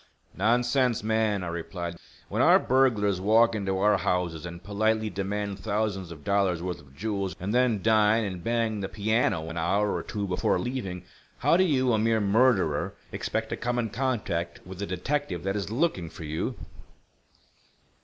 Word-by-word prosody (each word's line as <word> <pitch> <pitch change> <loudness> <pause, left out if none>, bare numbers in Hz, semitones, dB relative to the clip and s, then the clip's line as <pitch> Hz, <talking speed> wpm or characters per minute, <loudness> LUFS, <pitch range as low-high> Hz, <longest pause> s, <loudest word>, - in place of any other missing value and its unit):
"Nonsense, 120 0 +2
man," 110 -3 +1
I - - -4
replied. 85 +1 -5 0.3
"When - - -1
our - - +7
burglars 110 -8 +2
walk 115 +3 +4
into 95 -3 -1
our 105 +2 +4
houses 85 -2 -1
and 85 0 -9
politely 110 +1 0
demand, 100 +1 -3
thousands 100 -4 -2
of 80 -3 -10
dollars' 100 -3 +1
worth 90 -1 -3
of 70 -1 -18
jewels, 100 +1 -2
and 100 +3 -3
then 120 -5 +2
dine 110 0 +4
and 95 -4 -5
bang 115 -1 0
the 95 - -3
piano 105 -5 0
an 80 +1 -4
hour 100 +5 +1
or - - -2
two 105 -2 -4
before 90 -1 +1
leaving, 95 -4 -4 0.3
how - - +3
do 185 - +5
you, 130 -8 +2
a 110 - +2
mere 110 0 +2
murderer, 105 - +2 0.2
expect 110 0 -3
to - - -2
come 120 0 -2
in 115 -3 -1
contact 105 -9 -2
with 95 0 -9
the 100 - -3
detective 95 - -2
that 95 +1 -1
is 100 -1 -3
looking 110 - 0
for 80 - -10
you?" 80 +1 -3
105 Hz, 175 wpm, -27 LUFS, 90-115 Hz, 0.3 s, our